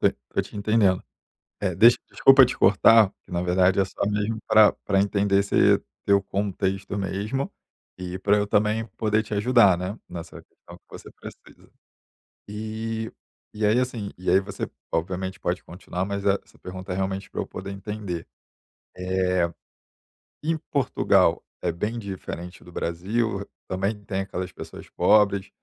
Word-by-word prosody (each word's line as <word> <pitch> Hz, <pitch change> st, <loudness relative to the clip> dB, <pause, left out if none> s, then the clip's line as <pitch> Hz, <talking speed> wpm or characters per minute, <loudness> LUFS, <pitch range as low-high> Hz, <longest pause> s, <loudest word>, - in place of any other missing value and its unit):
tô -, -, +4 dB, 0.2 s
tô -, -, +3 dB
te -, -, -11 dB
entendendo. 100 Hz, -3 st, +2 dB, 0.6 s
Eh 95 Hz, -4 st, -1 dB
deixa 115 Hz, +5 st, +7 dB
desculpa 135 Hz, -1 st, +7 dB
te 125 Hz, -, -4 dB
cortar, 105 Hz, +2 st, +6 dB
que -, -, -19 dB
na 85 Hz, 0 st, -1 dB
verdade 90 Hz, +2 st, +3 dB
é 95 Hz, -, +3 dB
só -, -, -9 dB
mesmo 105 Hz, +2 st, -1 dB
pra 110 Hz, -1 st, +7 dB
pra 100 Hz, -1 st, +2 dB
entender 100 Hz, 0 st, +2 dB
esse 100 Hz, -, +3 dB, 0.2 s
teu 100 Hz, 0 st, +4 dB
contexto 95 Hz, 0 st, -2 dB
mesmo, 105 Hz, +7 st, -2 dB, 0.5 s
e 90 Hz, 0 st, -5 dB
pra 100 Hz, +2 st, +3 dB
eu 105 Hz, 0 st, 0 dB
também 105 Hz, +2 st, +1 dB
poder 110 Hz, 0 st, +2 dB
te 105 Hz, -, -7 dB
ajudar, 105 Hz, -3 st, +5 dB
né, 95 Hz, +5 st, -4 dB
nessa 85 Hz, -2 st, -8 dB
questão -, -, -16 dB
que -, -, -39 dB
você -, -, -11 dB
precisa. -, -, -14 dB, 0.8 s
E 110 Hz, +1 st, -4 dB, 0.4 s
e 105 Hz, 0 st, -1 dB
aí, 110 Hz, +4 st, +4 dB
assim, 120 Hz, -5 st, -3 dB
e 90 Hz, -, -3 dB
aí 95 Hz, -, +6 dB
você 95 Hz, -, -5 dB, 0.2 s
obviamente 95 Hz, +3 st, -2 dB
pode 90 Hz, +1 st, -2 dB
continuar, 90 Hz, +1 st, -5 dB
mas 100 Hz, 0 st, -4 dB
essa 100 Hz, 0 st, -1 dB
pergunta 95 Hz, +1 st, -8 dB
é -, -, -2 dB
realmente 95 Hz, +1 st, -3 dB
pra -, -, -3 dB
eu -, -, -6 dB
poder 95 Hz, +1 st, -7 dB
entender, 100 Hz, -4 st, -5 dB, 0.7 s
eh, 90 Hz, -1 st, 0 dB, 0.9 s
em 165 Hz, +1 st, +1 dB, 0.2 s
Portugal 140 Hz, -4 st, +2 dB, 0.2 s
é 90 Hz, -, -1 dB
bem 105 Hz, +8 st, -3 dB
diferente 95 Hz, -4 st, -7 dB
do 90 Hz, -, -14 dB
Brasil, 100 Hz, +6 st, -2 dB, 0.2 s
também 100 Hz, +3 st, -2 dB
tem 95 Hz, 0 st, -2 dB
aquelas 95 Hz, -2 st, -5 dB
pessoas -, -, -10 dB
pobres, 100 Hz, -2 st, +3 dB
100 Hz, 155 wpm, -25 LUFS, 95-105 Hz, 0.9 s, deixa